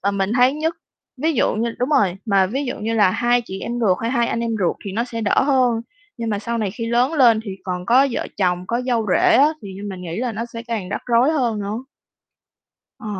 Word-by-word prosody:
ờ, 200 - +1
mình 195 0 -1
thấy 250 +1 +5
nhất, 320 +2 -1 0.5
ví 320 +1 +2
dụ 250 - +1
như 230 +1 -2
đúng 250 - 0
rồi, 195 -10 +3
mà 195 -4 +3
ví 270 +8 -3
dụ 250 - -4
như 225 +2 -2
là 205 -4 +4
hai 240 +4 +1
chị 190 -3 -7
em 235 - -4
ruột 190 -5 +2
hay 230 - 0
hai 235 -2 +1
anh 230 - -2
em 235 - -1
ruột 180 -4 0
thì 195 - -5
nó 230 +4 -1
sẽ 230 -2 -6
đỡ 215 - +2
hơn. 255 -4 +2 0.4
Nhưng 230 -2 -3
mà 205 - -1
sau 235 +3 -3
này 210 -4 -1
khi 230 +3 -5
lớn 245 +5 +2
lên 240 -7 +5
thì 205 - -5
còn 180 -1 -4
có 260 +5 +5
vợ - - -3
chồng, 180 -2 0
có 235 +4 -1
dâu 230 -4 0
rể - - +4
á, 285 +3 +6
thì 200 - -8 0.2
mình 185 - -7
nghĩ 170 -1 -5
là 240 +1 -2
nó 220 +2 -4
sẽ 230 0 -6
càng 225 -6 -4
rắc - - -3
rối 240 +4 +3
hơn 240 -8 0
nữa. 205 +3 -3 1.2
Ờ. - - -10
230 Hz, 255 wpm, -21 LUFS, 200-245 Hz, 1.2 s, á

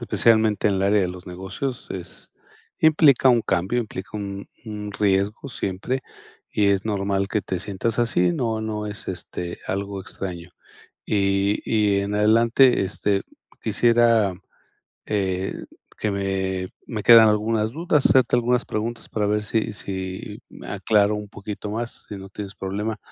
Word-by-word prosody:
especialmente 110 -3 +3
en 100 - +1
el 95 - 0
área 100 +1 +3
de 90 - 0
los 90 +1 -9
negocios, 95 +8 -5
es 90 -1 -8 0.5
implica 150 -4 +5
un 120 -2 +3
cambio, 95 +8 0
implica 100 -4 -7
un 100 -1 -6 0.2
un 105 -2 -6
riesgo 100 +5 0
siempre, 120 +4 -3 0.5
y 105 - +2
es 100 0 +2
normal 100 -2 -1
que 105 0 -1
te 95 - -3
sientas 105 +4 -2
así, 90 -7 +2
no 110 +2 -1
no 105 -1 -3
es, 105 0 -6
este, 90 -1 -5
algo 100 +1 -3
extraño. 90 -2 -7 0.6
Y 100 0 +1
y 105 -3 +2
en 100 +1 -2
adelante, 115 +4 +4
este, 100 +1 0 0.4
quisiera 115 -4 +3 0.7
eh, 95 -2 -1 0.4
que 105 - -1
me 95 -1 -2 0.2
me 110 -4 -4
quedan 115 -2 +9
algunas 110 +1 +1
dudas, 155 -1 +1
hacerte 130 -2 +4
algunas 120 0 +1
preguntas 115 +2 -4
para 105 -1 -1
ver 105 0 +1
si 110 0 -1
si 95 -2 -6
me - - -12
aclaro 105 -1 +2
un 105 -1 -6
poquito 100 +1 -7
más, 115 +3 -5
si 105 - -7
no 95 0 -9
tienes 100 0 -8
problema. 105 +3 -3
105 Hz, 150 wpm, -23 LUFS, 95-115 Hz, 0.7 s, quedan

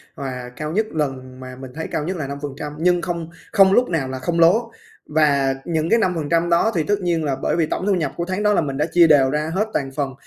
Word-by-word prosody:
và 125 -2 -6
cao 155 +3 -4
nhất 215 +5 +1
lần 130 -4 -4
mà 130 0 -9
mình 130 -1 -9
thấy 160 - -4
cao 150 - -1
nhất 185 +3 -3
là 140 -3 -4
5%, 140 +1 -6
nhưng 175 +1 +2
không 170 -2 -4 0.2
không 195 -2 +5
lúc 250 +3 +3
nào 155 -6 -1
là 130 0 -5
không 170 +3 -2
lố. 220 +8 +4 0.3
Và 140 -3 +2
những 160 -1 -1
cái 230 - +4
5% 170 -2 0
đó 170 +7 +3
thì 160 - +1
tất 205 +2 0
nhiên 170 -3 0
là 140 -3 -1
bởi - - 0
vì 165 -2 +2
tổng 185 - -3
thu 205 - +2
nhập 160 -6 -1
của 170 - -2
tháng 190 +3 -3
đó 210 0 +3
là - - +2
mình 135 -2 -3
đã 150 - +1
chia 170 -1 +6
đều 140 -4 +5
ra 150 +3 -2
hết 210 +3 +1
toàn 135 -2 -2
phần 140 -3 -2
160 Hz, 265 wpm, -21 LUFS, 140-175 Hz, 0.3 s, chia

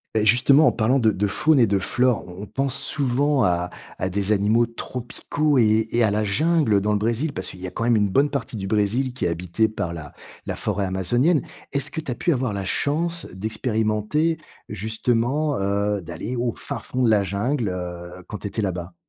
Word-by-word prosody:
Et 110 0 +2
justement, 135 +7 +5
en - - +5
parlant 125 +4 +2
de 110 - +4
de 105 -1 0
faune 150 +9 +2
et 120 - +6
de 100 -2 +1
flore, 125 +5 +1
on 90 +2 -8
on - - -5
pense 135 +4 -1
souvent 140 0 +1
à 90 -1 0 0.3
à 90 - -1
des 100 +2 0
animaux 110 +3 +3
tropicaux 130 +5 -2
et 110 -1 +3
et 120 0 +3
à 105 - +3
la 105 +1 +1
jungle 110 0 +2
dans 105 +2 0
le 105 - +1
Brésil, 120 +7 -1
parce 95 - -2
qu'il 95 - -10
y - - -5
a 90 - -5
quand 115 - -4
même 120 0 +3
une 105 -2 +2
bonne 140 +5 +3
partie 135 -4 -4
du 95 -2 -4
Brésil 110 +6 +1
qui 130 - -3
est - - +3
habitée 90 +6 0
par 105 -6 -4
la 75 -4 -8 0.3
la - - -3
forêt 100 - -1
amazonienne. 120 - +2 0.3
Est-ce 140 +1 -1
que 160 - -5
tu 140 - -4
as - - -2
pu 170 - 0
avoir 130 -6 0
la 100 -1 -3
chance 165 - -1
d'expérimenter 110 - 0 0.3
justement, 120 +7 0
heu, 100 +1 0
d'aller 85 +9 -5
au 120 -1 -1
fin - - -3
fond 130 - -3
de 120 - +4
la 105 -2 +4
jungle, 105 +5 -1
heu, 90 0 -6
quand 105 - -5
tu - - -4
étais 110 - -3
là-bas? 90 -2 -3
110 Hz, 215 wpm, -23 LUFS, 100-130 Hz, 0.3 s, et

